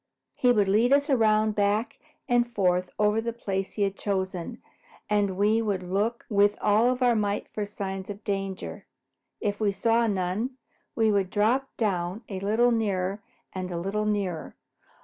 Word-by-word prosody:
He 250 Hz, -, +3 dB
would 210 Hz, -4 st, +3 dB
lead 220 Hz, +6 st, +3 dB
us 285 Hz, +1 st, +3 dB
around 215 Hz, -3 st, +3 dB
back 205 Hz, +2 st, 0 dB, 0.3 s
and 240 Hz, 0 st, +2 dB
forth 180 Hz, -4 st, +1 dB
over 210 Hz, +1 st, +2 dB
the 235 Hz, +1 st, -2 dB
place 195 Hz, -4 st, -3 dB
he 205 Hz, -, 0 dB
had 195 Hz, 0 st, 0 dB
chosen, 190 Hz, +2 st, -3 dB, 0.5 s
and 200 Hz, -3 st, +1 dB
we 215 Hz, +3 st, +3 dB
would 200 Hz, -4 st, -1 dB
all 180 Hz, -, -9 dB
look 215 Hz, +5 st, -1 dB
with 205 Hz, -1 st, +3 dB
all 230 Hz, +5 st, +3 dB
our 245 Hz, -2 st, +4 dB
might 205 Hz, -1 st, -1 dB
for 210 Hz, -1 st, -4 dB
signs 195 Hz, -2 st, -5 dB
of 205 Hz, +1 st, -7 dB
danger. 195 Hz, -1 st, -4 dB, 0.5 s
If 205 Hz, -1 st, -1 dB
we 205 Hz, -2 st, +3 dB
saw 230 Hz, +3 st, +2 dB
none, 200 Hz, +6 st, -2 dB, 0.4 s
we 225 Hz, -2 st, +3 dB
would 195 Hz, -3 st, +1 dB
drop 230 Hz, +7 st, +1 dB
down 190 Hz, -1 st, -1 dB
a 195 Hz, -2 st, -4 dB
little 220 Hz, +5 st, +2 dB
nearer 200 Hz, -3 st, -1 dB, 0.3 s
and 185 Hz, -1 st, -4 dB
a 175 Hz, -, -4 dB
little 210 Hz, +4 st, -1 dB
nearer. 195 Hz, -6 st, -2 dB
205 Hz, 170 wpm, -27 LUFS, 195-225 Hz, 0.5 s, our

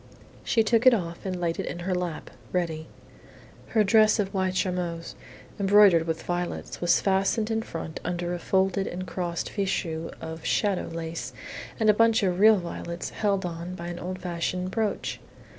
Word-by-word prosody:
She 225 Hz, -, +3 dB
took 230 Hz, +3 st, +3 dB
it 255 Hz, -, +8 dB
off 170 Hz, -2 st, -4 dB
and 185 Hz, -1 st, -3 dB
laid 170 Hz, -1 st, -1 dB
it -, -, -2 dB
in 175 Hz, -, -5 dB
her 190 Hz, -, 0 dB
lap, 180 Hz, -3 st, -3 dB, 0.2 s
ready. 160 Hz, -3 st, -2 dB, 0.8 s
Her 220 Hz, -, +3 dB
dress 215 Hz, +2 st, +5 dB
of 200 Hz, -2 st, -1 dB
white 190 Hz, -1 st, 0 dB
charmeuse, 180 Hz, -3 st, -2 dB, 0.5 s
embroidered 195 Hz, -4 st, +6 dB
with 160 Hz, 0 st, -2 dB
violets, 175 Hz, 0 st, -3 dB
was 175 Hz, 0 st, +4 dB
fastened 195 Hz, +3 st, +1 dB
in 225 Hz, 0 st, +1 dB
front 165 Hz, -6 st, -6 dB
under 175 Hz, 0 st, -2 dB
a 175 Hz, -, -3 dB
folded 190 Hz, +2 st, +1 dB
and 185 Hz, +1 st, -4 dB
crossed 175 Hz, -2 st, -3 dB
fichu 165 Hz, -5 st, -2 dB
of 160 Hz, 0 st, -7 dB
"shadow" 200 Hz, -3 st, +1 dB
lace 165 Hz, 0 st, -5 dB, 0.5 s
and 220 Hz, -, +2 dB
a 210 Hz, -, +7 dB
bunch 230 Hz, +1 st, +4 dB
of 180 Hz, -2 st, +1 dB
real 215 Hz, +1 st, +7 dB
violets 170 Hz, -1 st, -5 dB
held 200 Hz, -3 st, 0 dB
on 175 Hz, +1 st, -5 dB
by 170 Hz, -1 st, -6 dB
an 175 Hz, 0 st, -5 dB
old 185 Hz, +1 st, -4 dB
fashioned 180 Hz, +1 st, -3 dB
brooch. 220 Hz, 0 st, -2 dB
180 Hz, 175 wpm, -27 LUFS, 170-200 Hz, 0.8 s, it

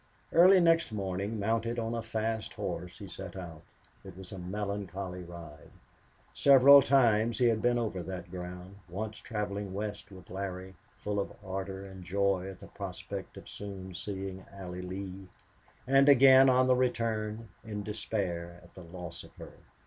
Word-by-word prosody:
Early 185 Hz, +3 st, +8 dB
next 165 Hz, -5 st, +3 dB
morning, 100 Hz, +1 st, -3 dB
mounted 115 Hz, +3 st, 0 dB
on 115 Hz, 0 st, -2 dB
a 115 Hz, -, -2 dB
fast 110 Hz, -1 st, -3 dB
horse, 90 Hz, 0 st, -5 dB
he 100 Hz, -, -9 dB
set 95 Hz, 0 st, -8 dB
out. 85 Hz, -4 st, -8 dB, 0.4 s
It 95 Hz, -2 st, -11 dB
was 95 Hz, -1 st, -10 dB
a 95 Hz, -, -7 dB
melancholy 95 Hz, -1 st, -4 dB
ride. 85 Hz, -4 st, -11 dB, 0.6 s
Several 140 Hz, 0 st, +8 dB
times 120 Hz, -4 st, +3 dB
he 125 Hz, -, +3 dB
had 115 Hz, -2 st, +3 dB
been 120 Hz, 0 st, +3 dB
over 110 Hz, -6 st, -2 dB
that 90 Hz, 0 st, -7 dB
ground, 90 Hz, +1 st, -8 dB
once 105 Hz, +4 st, -5 dB
traveling 100 Hz, -3 st, -4 dB
west 105 Hz, 0 st, -5 dB
with 95 Hz, -2 st, -13 dB
Larry, 95 Hz, -1 st, -5 dB, 0.2 s
full 105 Hz, 0 st, -2 dB
of 100 Hz, -, -2 dB
ardor 95 Hz, 0 st, -5 dB
and 95 Hz, -1 st, -10 dB
joy 95 Hz, 0 st, 0 dB
at 95 Hz, -, -9 dB
the -, -, -11 dB
prospect -, -, -7 dB
of -, -, -11 dB
soon 95 Hz, -2 st, -8 dB
seeing 95 Hz, 0 st, -5 dB
Allie 90 Hz, -2 st, -7 dB
Lee, 95 Hz, +1 st, -6 dB, 0.6 s
and 135 Hz, +2 st, +5 dB
again 135 Hz, -1 st, +8 dB
on 130 Hz, 0 st, +4 dB
the 130 Hz, 0 st, +4 dB
return, 115 Hz, -3 st, -1 dB
in 105 Hz, -2 st, -5 dB
despair 95 Hz, -5 st, -3 dB
at 85 Hz, -, -18 dB
the 95 Hz, -, -11 dB
loss 85 Hz, -1 st, -8 dB
of -, -, -16 dB
her. -, -, -11 dB
100 Hz, 165 wpm, -31 LUFS, 95-115 Hz, 0.6 s, Early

